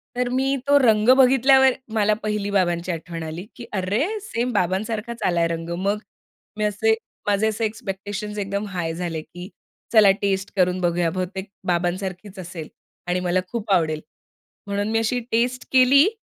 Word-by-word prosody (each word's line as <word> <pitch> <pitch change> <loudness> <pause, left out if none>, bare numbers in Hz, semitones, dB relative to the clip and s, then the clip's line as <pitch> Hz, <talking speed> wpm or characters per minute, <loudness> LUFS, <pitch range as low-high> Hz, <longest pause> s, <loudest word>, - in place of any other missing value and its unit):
तर 250 0 0
मी 265 +2 +1
तो 285 - +6
रंग 220 -3 +4
बघितल्यावर 265 0 +6 0.2
मला 215 -1 +3
पहिली 210 -1 -1
बाबांची 175 -2 +1
आठवण 165 0 -6
आली, 160 +4 -6
की 240 - -9
अरे 205 - 0
सेम 250 - -2
बाबांसारखाच 215 +5 -1
आलाय 170 -1 +2
रंग. 165 0 -4
मग 200 +2 +1 0.6
मी 215 - -1
असे, 210 +1 +2 0.3
माझे 205 +1 +2
असे 220 +1 -1
एक्स्पेक्टेशन्स 210 0 -5
एकदम 200 0 -2
हाय 175 -4 -3
झाले 165 -2 -3
की 175 +4 -10 0.4
चला 210 -3 +7
टेस्ट 195 -1 -1
करून 180 -1 +2
बघूया 175 -1 +1
बहुतेक 185 +2 -4 0.2
बाबांसारखीच 185 +3 -2
असेल 170 -3 -7 0.4
आणि 180 +1 +1
मला 180 0 +1
खूप 220 0 -4
आवडेल 155 -4 +1 0.7
म्हणून 205 +1 -1
मी 225 - +2
अशी 225 +2 0
टेस्ट 245 +2 0
केली 265 +5 +6
200 Hz, 155 wpm, -23 LUFS, 180-225 Hz, 0.7 s, चला